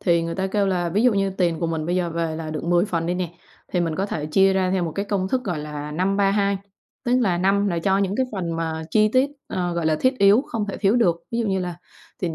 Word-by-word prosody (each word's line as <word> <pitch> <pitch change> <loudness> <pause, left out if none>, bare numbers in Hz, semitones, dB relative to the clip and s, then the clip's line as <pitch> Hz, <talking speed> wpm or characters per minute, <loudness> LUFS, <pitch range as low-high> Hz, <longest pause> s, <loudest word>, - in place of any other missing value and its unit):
thì 170 -2 +2
người 165 0 -3
ta 190 0 -1
kêu 200 +1 +1
là 180 -2 0
ví 200 +6 +1
dụ 250 -1 +5
như 195 0 +1
tiền 175 -4 0
của 170 - 0
mình 160 -1 -2
bây 175 +1 0
giờ 175 -2 0
về 165 -1 -2
là 160 -1 -5
được 155 0 -4
10 175 +1 +3
phần 165 -5 -2
đi 175 - 0
nè, 175 -2 -3 0.4
thì 180 - +1
mình 165 -2 -1
có 195 +4 -1
thể 150 -6 -3
chia 195 +5 +4
ra 190 -1 +1
theo 185 -2 +1
một 160 - -4
cái 200 - -1
công 195 -2 -1
thức, 255 +2 -1
gọi 175 -7 -2
là, 150 0 -6
5-3-2. 195 +3 +1 0.5
Tức 245 +1 +2
là 185 -7 +1
5 200 +2 +2
là 170 -3 -1
cho 190 +3 +2
những 200 0 0
cái 260 - +1
phần 175 -5 -3
mà 160 -1 -3
chi 215 +4 +4
tiết, 260 +2 +3 0.2
ờ, 175 -1 -2
gọi 170 -2 -1
là, 155 -1 +2
thiết 255 0 +2
yếu 200 +6 +6
không 215 -3 -3
thể 200 - -4
thiếu 200 +3 +2
được, 175 -8 +2
ví 230 - -1
dụ 230 - 0
như 190 -2 0
là 180 -2 -4 0.4
tiền 170 -3 -2
185 Hz, 285 wpm, -23 LUFS, 165-200 Hz, 0.5 s, yếu